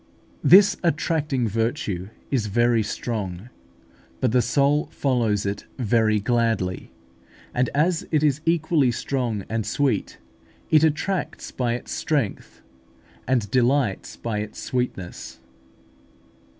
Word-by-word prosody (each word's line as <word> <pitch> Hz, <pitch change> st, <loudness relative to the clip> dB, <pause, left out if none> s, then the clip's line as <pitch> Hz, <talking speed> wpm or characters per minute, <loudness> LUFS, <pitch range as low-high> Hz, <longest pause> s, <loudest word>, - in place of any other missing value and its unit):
This 195 Hz, +2 st, +7 dB
attracting 150 Hz, -5 st, 0 dB
virtue 105 Hz, -4 st, -2 dB, 0.2 s
is 120 Hz, -6 st, +1 dB
very 120 Hz, +2 st, +2 dB
strong 105 Hz, -1 st, -4 dB, 0.7 s
but 125 Hz, -, +1 dB
the 125 Hz, +1 st, +4 dB
soul 145 Hz, +3 st, +2 dB
follows 115 Hz, -7 st, 0 dB
it 100 Hz, +1 st, -4 dB
very 110 Hz, -3 st, +2 dB
gladly; 110 Hz, -4 st, 0 dB, 0.6 s
and 125 Hz, 0 st, +1 dB
as 165 Hz, +3 st, +1 dB
it 155 Hz, -2 st, +1 dB
is 150 Hz, -1 st, +2 dB
equally 160 Hz, -4 st, +2 dB
strong 120 Hz, -5 st, -2 dB
and 115 Hz, 0 st, -2 dB
sweet, 130 Hz, -3 st, -1 dB, 0.5 s
it 155 Hz, 0 st, +6 dB
attracts 170 Hz, +5 st, -1 dB
by 120 Hz, -2 st, -1 dB
its 120 Hz, -, -6 dB
strength 145 Hz, -10 st, -2 dB, 0.6 s
and 120 Hz, -6 st, 0 dB
delights 125 Hz, -4 st, +1 dB
by 110 Hz, -3 st, -3 dB
its 105 Hz, 0 st, -6 dB
sweetness. 95 Hz, -, -4 dB
120 Hz, 110 wpm, -24 LUFS, 110-145 Hz, 0.7 s, This